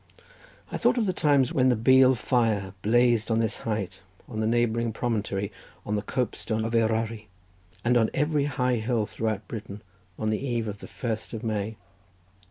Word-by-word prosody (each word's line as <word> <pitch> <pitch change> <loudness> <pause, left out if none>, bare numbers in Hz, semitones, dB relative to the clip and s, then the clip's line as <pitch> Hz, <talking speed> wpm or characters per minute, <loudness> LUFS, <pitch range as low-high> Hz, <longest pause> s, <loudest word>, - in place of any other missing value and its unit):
I - - -2
thought - - +2
on 235 - +2
the 185 - 0
times 140 -6 +3
when 130 -1 +4
the 125 - +4
Beal 130 +3 +6
fire 110 -6 0
blazed 120 0 +3
on 110 - +2
this 115 -1 0
height, 105 -4 -2 0.3
on 110 - -5
the 110 - +1
neighbouring 115 0 +1
promontory, 105 -4 -2 0.3
on 105 - -1
the 105 - 0
copestone 110 -1 -2
of 115 - -3
Eryri, 110 -1 0 0.6
and 120 +1 +3
on 115 -2 +4
every 150 0 +1
high 125 -3 0
hill 110 -1 0
throughout 110 -1 -3
Britain 105 -2 -7 0.3
on 110 0 -1
the 110 - -2
eve 120 -4 -1
of 105 -1 -5
the - - -9
first 115 -2 -4
of 115 +1 -5
May. 110 -1 -2
115 Hz, 180 wpm, -27 LUFS, 110-125 Hz, 0.6 s, Beal